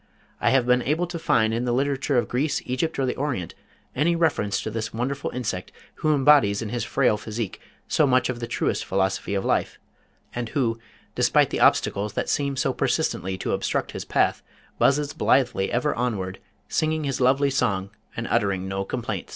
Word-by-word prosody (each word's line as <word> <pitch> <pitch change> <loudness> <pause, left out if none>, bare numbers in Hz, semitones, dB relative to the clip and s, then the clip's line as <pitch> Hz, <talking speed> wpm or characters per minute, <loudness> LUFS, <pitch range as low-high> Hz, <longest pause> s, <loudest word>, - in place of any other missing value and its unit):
I - - +2
have 130 -2 +3
been 125 0 +3
unable 155 +7 0
to 175 -1 -6
find 110 -8 +2
in 120 +2 -1
the 120 - 0
literature 135 +1 0
of 120 - +1
Greece, 140 +4 0
Egypt 130 +6 -2
or 135 - +1
the 125 - -1
Orient, 130 - -2 0.4
any 165 +5 +2
reference 145 -12 +1
to 110 - -4
this 110 0 -3
wonderful 135 +4 -2
insect 110 -7 -4 0.3
who 155 -1 +2
embodies 135 -8 +5
in 110 - -5
his 120 0 -2
frail 125 -3 +2
physique 110 -1 -5 0.3
so 150 - +3
much 130 -1 +3
of 125 -2 -3
the 115 - -4
truest 120 - -1
philosophy 95 +1 -1
of 95 - -1
life, - - 0 0.6
and 120 -1 -3
who, 115 -5 0 0.3
despite - - +3
the - - -1
obstacles 100 +1 +2
that - - -2
seem 140 -1 0
so - - +1
persistently 95 +2 -1
to - - -3
obstruct - - -1
his - - -5
path, - - +1 0.4
buzzes 145 +1 +2
blithely 120 -7 +2
ever 125 +5 +1
onward, 100 -6 -2 0.3
singing 155 0 0
his 135 -2 -2
lovely 135 +2 +3
song 100 -6 0 0.3
and - - -2
uttering 95 -2 +1
no 95 0 -2
complaints. - - -4
125 Hz, 185 wpm, -24 LUFS, 105-140 Hz, 0.6 s, embodies